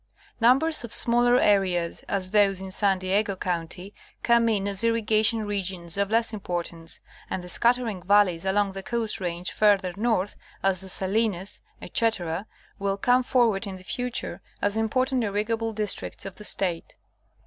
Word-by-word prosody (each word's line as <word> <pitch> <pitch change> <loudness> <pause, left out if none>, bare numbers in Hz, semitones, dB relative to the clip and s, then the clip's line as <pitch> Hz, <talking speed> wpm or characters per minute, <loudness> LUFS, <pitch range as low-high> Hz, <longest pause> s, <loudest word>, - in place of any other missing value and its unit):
Numbers 270 +7 +4
of 235 - -7
smaller 240 +1 +4
areas, 185 -4 +1
as 185 -2 -1
those 200 -3 +3
in 190 0 -7
San 195 0 +2
Diego 195 +2 0
county, 180 +2 -4 0.3
come 235 -1 +3
in 200 -3 0
as 200 +1 +1
irrigation 225 -1 +2
regions 185 -4 -1
of 200 0 0
less 230 +1 +1
importance, 170 -4 -5 0.3
and 180 - -4
the - - -9
scattering 235 -2 +1
valleys 190 -3 +3
along 195 +1 +1
the 195 0 -7
Coast 225 -1 -3
Range 175 0 -3
farther 200 -4 +2
north, 210 -2 0 0.3
as 195 -2 +1
the 190 - -9
Salinas, 195 0 -2 0.2
etc., 195 -4 0 0.3
will 195 0 -1
come 250 +4 +3
forward 230 -5 +1
in 190 -1 -6
the 185 - -14
future 240 -4 -3 0.2
as 205 +1 0
important 255 +3 0
irrigable 220 +2 -1
districts 210 -1 -1
of 195 - -8
the 210 - -10
State. 175 -5 -1
200 Hz, 155 wpm, -25 LUFS, 185-225 Hz, 0.3 s, Numbers